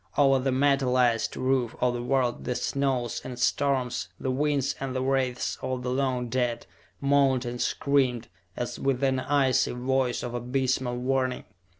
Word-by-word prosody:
Over 135 -2 +5
the 130 +1 0
metalized 130 -3 +2
roof 130 -3 0
of 125 0 +2
the 120 - -3
world 125 -1 0
the 125 - -1
snows 130 -4 -1
and 125 -1 -7
storms, 130 -1 0
the 130 - -1
winds 140 0 0
and 135 -1 -4
the 130 - 0
wraiths 130 -2 0
of 130 -1 -3
the 125 - -2
long 130 -2 0
dead 120 -1 -1 0.3
moaned 140 -2 +3
and 120 0 -4
screamed 130 -5 +1 0.3
as 120 0 -4
with 135 -1 0
an 130 -1 +2
icy 135 -2 +2
voice 125 0 0
of 120 - -4
abysmal 125 0 -1
warning. 130 0 0
130 Hz, 160 wpm, -27 LUFS, 125-135 Hz, 0.3 s, Over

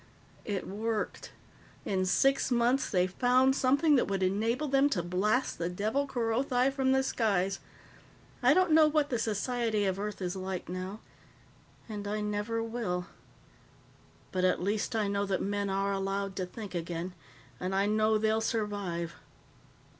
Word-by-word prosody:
It 200 -3 -3
worked. 215 +2 -3 0.5
In 185 -1 0
six 270 +9 +3
months, 245 +2 +2
they 180 -2 +2
found 250 +7 +3
something 280 +3 +4
that - - +2
would 195 -1 -1
enable 225 +10 0
them 275 +1 +3
to 180 -11 -1
blast 205 +9 0
the 170 0 -1
devil 215 +10 -1
Kerothi 250 +2 +1
from 265 -1 +1
the 265 0 +3
skies. 195 -6 0 0.8
I - - +5
don't 370 -2 +3
know 310 0 +7
what 300 -1 +1
the 240 - 0
society 225 0 0
of 190 0 -1
Earth 210 0 -4
is 180 -1 -3
like 185 -1 -4
now 185 +4 -5 0.9
and 205 -2 -5
I 210 +1 -2
never 210 +2 -2
will. 220 -6 -3 1.3
But 185 -1 -1
at 185 - +3
least 205 +4 -1
I 215 -2 +1
know 200 0 -1
that 190 -1 0
men 200 0 -1
are 195 +1 0
allowed 195 0 -2
to 185 -2 -2
think 205 +1 -8
again. 170 +1 -4 0.5
And 185 +1 -2
I 195 +1 +3
know 215 +1 +3
they'll 220 +1 +1
survive." 205 -7 -2
210 Hz, 155 wpm, -30 LUFS, 190-245 Hz, 1.3 s, know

